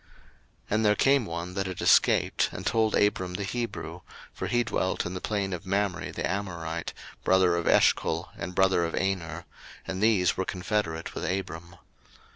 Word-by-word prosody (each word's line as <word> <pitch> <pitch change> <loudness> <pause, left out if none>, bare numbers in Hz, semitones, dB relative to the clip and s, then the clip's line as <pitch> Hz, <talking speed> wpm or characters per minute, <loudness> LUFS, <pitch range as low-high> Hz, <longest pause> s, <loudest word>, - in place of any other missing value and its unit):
01:014:013 - - -30 0.6
And 110 +1 +2
there 105 0 +5
came 135 +1 +3
one 85 +2 -5
that 95 0 -2
had 95 -2 -6
escaped, - - +4
and - - -7
told 110 -1 +2
Abram 95 -3 +1
the 100 - -2
Hebrew; 120 +3 -4 0.3
for - - -4
he 120 0 +2
dwelt 95 - -1
in 90 - -4
the 90 - -5
plain 100 -3 -1
of 90 0 -6
Mamre 100 -1 -1
the - - -2
Amorite, 85 -4 -3 0.3
brother 95 -2 +4
of 85 - -2
Eshcol, - - +3
and 90 - -6
brother 95 -2 +3
of 85 - -2
Aner: 90 -3 -2 0.4
and 95 0 -4
these 105 -5 +3
were 95 - -1
confederate 90 -3 -2
with - - -5
Abram. 85 -1 -4
95 Hz, 175 wpm, -27 LUFS, 85-105 Hz, 0.6 s, there